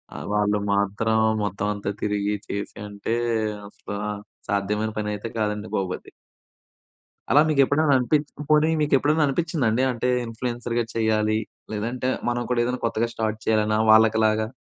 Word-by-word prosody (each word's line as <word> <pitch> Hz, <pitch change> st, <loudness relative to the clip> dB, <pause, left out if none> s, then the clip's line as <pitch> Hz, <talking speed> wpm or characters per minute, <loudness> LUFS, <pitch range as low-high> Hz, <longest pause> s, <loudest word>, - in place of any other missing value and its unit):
ఆహ్, -, -, -6 dB
వాళ్ళు 105 Hz, 0 st, +2 dB
మాత్రం 100 Hz, +3 st, +1 dB, 0.2 s
మొత్తం 100 Hz, +1 st, -2 dB
అంతా 100 Hz, -1 st, -3 dB
తిరిగి, 105 Hz, 0 st, 0 dB
చేసి 100 Hz, 0 st, -5 dB
అంటే 105 Hz, +3 st, -3 dB, 0.5 s
అసల 100 Hz, -, -9 dB, 0.6 s
సాధ్యమైన 105 Hz, +2 st, 0 dB
పనైతే 105 Hz, +1 st, -3 dB
కాదండి 105 Hz, 0 st, -1 dB
బాబు 95 Hz, -2 st, -1 dB
అది. -, -, -17 dB, 1.2 s
అలా 145 Hz, -, +7 dB
మీకు 140 Hz, -3 st, +4 dB
ఎప్పుడైనా 145 Hz, +1 st, +2 dB
అనిపిచ్ 145 Hz, +4 st, +1 dB, 0.2 s
పోనీ 155 Hz, +1 st, +5 dB
మీకు 150 Hz, -, 0 dB
ఎప్పుడైనా 150 Hz, +3 st, +2 dB
అనిపిచ్చిందా 155 Hz, -2 st, 0 dB
అండి? 120 Hz, +4 st, +1 dB
అంటే 125 Hz, +1 st, -1 dB, 0.2 s
ఇన్‌ఫ్లుయెన్సర్‌గా 120 Hz, 0 st, -2 dB
చెయ్యాలి. 110 Hz, -1 st, +1 dB, 0.3 s
లేదంటే 120 Hz, +4 st, -2 dB, 0.2 s
మనం 120 Hz, 0 st, -1 dB
కూడా 120 Hz, -1 st, +2 dB
ఏదైనా 125 Hz, +1 st, -2 dB
కొత్తగా 115 Hz, 0 st, 0 dB
స్టార్ట్ 110 Hz, -1 st, -2 dB
చేయాలన్న 110 Hz, -1 st, +2 dB
వాళ్ళకి 110 Hz, 0 st, +5 dB
లాగా. 110 Hz, 0 st, +2 dB
110 Hz, 145 wpm, -24 LUFS, 105-125 Hz, 1.2 s, అలా